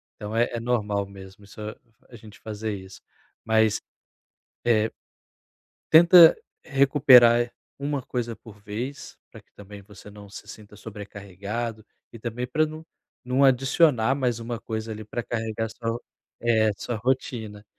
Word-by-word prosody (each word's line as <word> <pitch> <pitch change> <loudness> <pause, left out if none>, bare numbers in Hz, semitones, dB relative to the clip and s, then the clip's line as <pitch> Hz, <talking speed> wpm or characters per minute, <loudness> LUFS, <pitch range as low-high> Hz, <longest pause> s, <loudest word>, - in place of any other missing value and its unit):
Então 105 +1 -7
é 120 +1 +2
é 115 - -2
normal 105 -4 -1
mesmo 95 0 -13
isso 100 +2 -15 0.5
a 120 - -14
gente 110 -1 -14
fazer 110 0 -5
isso, 95 0 -12 0.4
mas, 110 -1 +2 0.8
eh, 110 -2 +2 1.0
tenta 170 +1 +8 0.3
recuperar 130 -4 +5 0.3
1 140 -1 -3
coisa 120 -2 -4
por 105 -2 -15
vez, 115 +7 -7
pra - - -13
que - - -34
também 100 0 -12
você 105 +1 -14
não 100 -1 -13
se 100 - -11
sinta 105 -1 -13
sobrecarregado, 105 +2 -7 0.3
e 115 - -10
também 120 +2 -4
para 155 +5 +1 0.6
não 130 +2 +2
adicionar 135 -1 +3
mais 125 -4 -1
1 115 0 -5
coisa, 110 0 -5
ali, 110 - -7
para 120 +3 -5
carregar 115 -1 -3
sua 115 0 -6
ro 120 +1 -5 0.4
eh, 110 -2 +3
sua 120 - -4
rotina, 110 -3 -3
115 Hz, 140 wpm, -25 LUFS, 105-125 Hz, 1.0 s, tenta